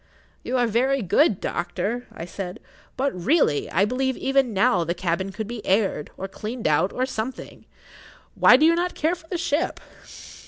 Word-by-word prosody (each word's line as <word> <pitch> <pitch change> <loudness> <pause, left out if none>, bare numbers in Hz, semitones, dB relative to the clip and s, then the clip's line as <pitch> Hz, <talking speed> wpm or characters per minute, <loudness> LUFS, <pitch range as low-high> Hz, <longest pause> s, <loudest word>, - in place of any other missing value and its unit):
"You 255 - -2
are 245 - +3
very 250 +3 +1
good, 200 - +3
doctor," 225 +7 -3
I 165 - -7
said. 180 0 -6 0.4
"But 275 +1 0
really, 180 - +1
I 190 +4 +2
believe 260 +3 -1
even 270 -2 +1
now 190 -3 +3
the 170 +1 -2
cabin 185 +2 -2
could 220 +3 -5
be 235 -2 -6
aired, 190 -6 +1
or 195 - -4
cleaned 215 +5 -5
out, 160 +5 +2
or 255 - -1
something. 255 0 -6 0.7
Why 250 - +7
do 305 - +4
you 330 - +6
not 350 +1 -1
care 320 +2 +1
for 330 -2 -9
the 355 - -3
ship?" 330 -1 -1
230 Hz, 180 wpm, -24 LUFS, 190-270 Hz, 0.7 s, Why